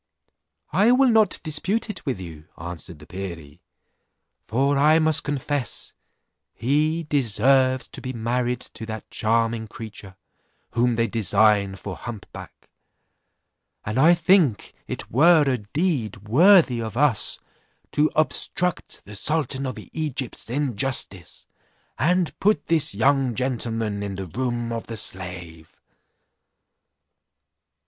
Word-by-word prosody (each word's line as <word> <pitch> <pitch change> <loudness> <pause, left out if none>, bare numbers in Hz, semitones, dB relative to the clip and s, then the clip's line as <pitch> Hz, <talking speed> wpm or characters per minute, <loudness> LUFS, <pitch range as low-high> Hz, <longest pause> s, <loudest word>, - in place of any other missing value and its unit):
"I 205 +8 +4
will 260 +1 +5
not 220 -2 +3
dispute 185 +9 0
it 210 - -6
with 125 -8 -1
you," 80 -4 -10
answered 85 0 -8
the 75 - -14
perie; 85 -4 -8 0.9
"for 135 +5 +1
I 150 +3 +5
must 160 -1 +2
confess 145 -2 -3 0.6
he 150 +7 +1
deserves 130 -1 +2
to - - -9
be 130 - -4
married 120 +1 -1
to 110 - -9
that 110 -1 -7
charming 115 0 0
creature, 105 -3 -10 0.6
whom 120 0 +1
they 115 0 +2
design 105 -2 +2
for 95 -1 -7
hump 115 -4 -8
back; - - -12 1.2
and 105 +4 -1
I 165 +5 +6
think 170 - +2
it - - -6
were 160 +5 +6
a 130 -3 0
deed 110 - -2
worthy 155 - +5
of 110 0 -5
us 130 -8 +2 0.5
to 150 +1 +2
obstruct 175 +2 -1
the 105 - -10
sultan 140 +2 0
of 130 - -5
Egypt's 140 -7 -3
injustice, 125 - -2 0.5
and 180 +3 +1
put 210 +2 +2
this 160 -10 +2
young 130 +2 +2
gentleman 115 -4 -2
in 100 -1 -4
the 95 0 -5
room 120 +4 -3
of 115 - -5
the 115 - -6
slave." 90 -5 -6
120 Hz, 125 wpm, -23 LUFS, 105-150 Hz, 1.2 s, I